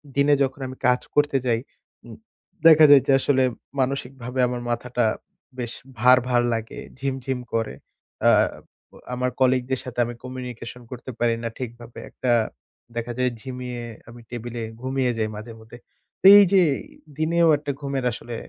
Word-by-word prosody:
দিনে 140 Hz, +1 st, +4 dB
যখন 135 Hz, 0 st, -3 dB
আমি 130 Hz, -, -8 dB
কাজ 125 Hz, 0 st, +3 dB
করতে 145 Hz, -2 st, +3 dB
যাই, 115 Hz, -2 st, +2 dB, 0.5 s
উম 115 Hz, -, -10 dB, 0.5 s
দেখা 155 Hz, -1 st, +8 dB
যায় 145 Hz, -2 st, +8 dB
যে -, -, +4 dB
আসলে 130 Hz, -1 st, +2 dB, 0.4 s
মানসিক 130 Hz, -1 st, -1 dB
ভাবে 125 Hz, +2 st, -4 dB
আমার 125 Hz, 0 st, -4 dB
মাথাটা 120 Hz, 0 st, -1 dB, 0.5 s
বেশ 120 Hz, -1 st, -3 dB, 0.3 s
ভার, 125 Hz, +3 st, +7 dB
ভার 120 Hz, -1 st, +3 dB
লাগে, 115 Hz, 0 st, -5 dB, 0.2 s
ঝিম, 135 Hz, -1 st, -1 dB
ঝিম 130 Hz, -2 st, -2 dB
করে। 115 Hz, -7 st, -1 dB, 0.5 s
অ্যা -, -, +5 dB, 0.8 s
আমার 125 Hz, +1 st, 0 dB
colleague 130 Hz, -1 st, +2 dB
দের 130 Hz, -, +1 dB
সাথে 125 Hz, -1 st, -6 dB
আমি 120 Hz, -, -5 dB
communication 125 Hz, -2 st, -7 dB
করতে 125 Hz, +1 st, -7 dB
পারি 120 Hz, -1 st, +2 dB
না 115 Hz, -, -2 dB
ঠিকভাবে। 120 Hz, -2 st, -8 dB
একটা 125 Hz, -2 st, -2 dB, 0.6 s
দেখা 120 Hz, +1 st, -3 dB
যায় 125 Hz, -1 st, +1 dB
ঝিমিয়ে 125 Hz, -1 st, -6 dB, 0.3 s
আমি 120 Hz, +1 st, -12 dB
টেবিলে 120 Hz, 0 st, -6 dB, 0.2 s
ঘুমিয়ে 130 Hz, -1 st, 0 dB
যাই 110 Hz, -1 st, -1 dB
মাঝে-মধ্যে। 110 Hz, +1 st, -11 dB, 0.4 s
তো -, -, -6 dB
এই 205 Hz, -, +8 dB
যে 190 Hz, -, +6 dB, 0.6 s
দিনেও 165 Hz, +2 st, +2 dB
একটা 145 Hz, 0 st, -4 dB
ঘুমের 140 Hz, -2 st, -3 dB
আসলে 120 Hz, +1 st, -7 dB
125 Hz, 160 wpm, -23 LUFS, 120-135 Hz, 0.8 s, দেখা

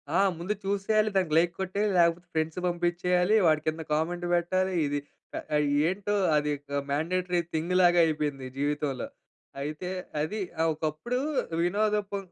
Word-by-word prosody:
ఆ! -, -, +4 dB, 0.2 s
ముందు 190 Hz, +5 st, -1 dB
చూసేయాలి. 210 Hz, +2 st, +1 dB
దానికి 180 Hz, -5 st, +1 dB
లైక్ 170 Hz, +1 st, +3 dB
కొట్టేయాలి. 200 Hz, +2 st, 0 dB
లేకపోతే 170 Hz, +1 st, +2 dB
ఫ్రెండ్స్ 160 Hz, +2 st, -1 dB
పంపించేయాలి. 180 Hz, +3 st, +1 dB
వాటి 155 Hz, -1 st, +4 dB
కింద 160 Hz, +1 st, -1 dB
కామెంట్ 175 Hz, +3 st, -1 dB
పెట్టాలి. 185 Hz, +2 st, 0 dB
ఇది 145 Hz, 0 st, -1 dB, 0.4 s
ఆహ్, 150 Hz, -1 st, 0 dB, 0.2 s
ఏంటో 200 Hz, +3 st, -1 dB, 0.2 s
అది 150 Hz, 0 st, +1 dB, 0.2 s
ఆహ్, 140 Hz, -, 0 dB
మాండేటరీ 175 Hz, +5 st, 0 dB
థింగ్‌లాగా 175 Hz, +2 st, +3 dB
అయిపోయింది 150 Hz, -4 st, -2 dB
జీవితంలో. 145 Hz, -2 st, -1 dB, 0.5 s
అయితే 155 Hz, +5 st, -4 dB, 0.3 s
అది 190 Hz, +8 st, -2 dB, 0.2 s
అహ్, 165 Hz, -, +3 dB
ఒకప్పుడు 155 Hz, +11 st, -3 dB, 0.5 s
వినోదం 210 Hz, +3 st, +1 dB
కో 200 Hz, -, -1 dB
175 Hz, 135 wpm, -28 LUFS, 155-185 Hz, 0.5 s, ఆ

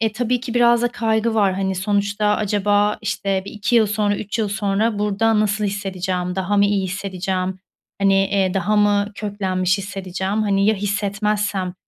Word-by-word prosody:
eee, 220 Hz, -1 st, +1 dB
tabii 245 Hz, +2 st, -1 dB
ki 245 Hz, -2 st, -6 dB
biraz 240 Hz, 0 st, +4 dB
da 240 Hz, -, +2 dB
kaygı 225 Hz, -1 st, 0 dB
var. 200 Hz, -3 st, +2 dB
Hani, 190 Hz, 0 st, -1 dB
sonuçta 200 Hz, +2 st, 0 dB
acaba, 205 Hz, 0 st, +1 dB
işte, 195 Hz, -1 st, -1 dB
bir -, -, -8 dB
2 210 Hz, +2 st, 0 dB
yıl 220 Hz, -2 st, +5 dB
sonra, 205 Hz, 0 st, 0 dB
3 210 Hz, +2 st, -4 dB
yıl 215 Hz, -2 st, 0 dB
sonra 205 Hz, +1 st, 0 dB
burada 210 Hz, +1 st, +1 dB
nasıl 210 Hz, 0 st, 0 dB
hissedeceğim, 185 Hz, -2 st, -3 dB
daha 190 Hz, +2 st, 0 dB
mı 200 Hz, -, +5 dB
iyi 200 Hz, -2 st, 0 dB
hissedeceğim, 190 Hz, 0 st, -3 dB, 0.4 s
hani, 195 Hz, -1 st, +4 dB
eee, 195 Hz, -1 st, +1 dB
daha 205 Hz, +3 st, +1 dB
mı 205 Hz, 0 st, +2 dB
köklenmiş 190 Hz, -2 st, -1 dB
hissedeceğim, 195 Hz, +1 st, -3 dB
hani, 200 Hz, -1 st, +1 dB
ya 220 Hz, -, +4 dB
hissetmezsem, 205 Hz, -1 st, -1 dB
205 Hz, 170 wpm, -20 LUFS, 195-215 Hz, 0.4 s, yıl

